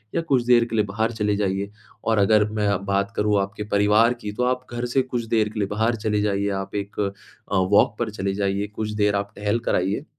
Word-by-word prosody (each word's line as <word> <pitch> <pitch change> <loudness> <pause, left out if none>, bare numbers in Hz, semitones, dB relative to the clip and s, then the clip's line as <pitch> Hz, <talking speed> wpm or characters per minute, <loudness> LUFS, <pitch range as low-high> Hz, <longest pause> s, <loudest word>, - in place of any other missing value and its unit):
या - - +2
कुछ 135 -7 +1
देर 120 -1 +5
के 115 - -5
लिए 105 -2 +2
बाहर 110 +3 -1
चले 105 -2 0
जाइए। 100 0 -1 0.4
और 110 -1 +2
अगर 105 +1 +4
मैं 105 -1 0
अब 100 0 -1
बात 100 0 0
करूँ 105 -1 +2
आपके 100 +2 -4
परिवार 105 +4 +4
की, 110 -4 -7
तो 125 +4 -2
आप 125 0 0
घर 120 +1 -2
से 135 - +5
कुछ 125 -2 -3
देर 105 -1 +2
के 110 - -6
लिए 100 - 0
बाहर 110 +3 +1
चले 105 -1 +1
जाइए, 100 -1 0
आप 95 0 -4
एक 100 0 -4 0.5
अ, - - +2
वॉक 100 +3 +3
पर 115 -2 -1
चले 100 -2 -2
जाइए, 100 0 -1
कुछ 110 -1 -3
देर 105 0 +2
आप 100 +1 -3
टहल 105 +3 0
कर - - +2
आइए 100 - -1
105 Hz, 240 wpm, -23 LUFS, 100-115 Hz, 0.5 s, देर